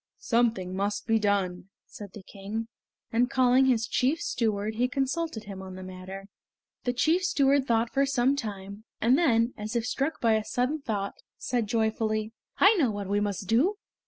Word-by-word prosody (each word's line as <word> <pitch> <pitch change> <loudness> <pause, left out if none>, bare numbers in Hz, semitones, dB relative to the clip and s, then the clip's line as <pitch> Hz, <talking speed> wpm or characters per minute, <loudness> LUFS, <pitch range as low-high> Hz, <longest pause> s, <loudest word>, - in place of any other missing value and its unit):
"Something 225 -6 0
must 200 +1 -2
be 225 -1 +2
done," 195 -3 -1 0.2
said 205 -3 -11
the 205 - -10
King, 205 +4 -6 0.4
and 245 +2 +2
calling 260 0 +4
his 235 -3 +2
chief 265 +7 +1
steward 220 - -1
he 240 +3 +1
consulted 270 -1 -2
him 200 -2 -8
on 190 -1 -8
the 185 - -8
matter. 185 +1 -8 0.6
The 245 - +1
chief 315 +8 +2
steward 280 -6 +2
thought 230 0 +1
for 275 0 +2
some 270 0 +2
time, 205 -4 -6
and 240 +3 +4
then, 245 -7 +2
as 215 +3 -5
if 235 -1 0
struck 290 +5 -2
by 230 -2 +3
a 220 -1 +1
sudden 255 +7 -1
thought, 205 -6 -3 0.2
said 240 -4 -1
joyfully: 220 -1 0 0.3
"I 395 +4 +7
know 280 -9 +3
what 205 -2 -4
we 205 +1 +2
must 200 -2 -3
do! 295 - +2
225 Hz, 180 wpm, -27 LUFS, 205-260 Hz, 0.6 s, I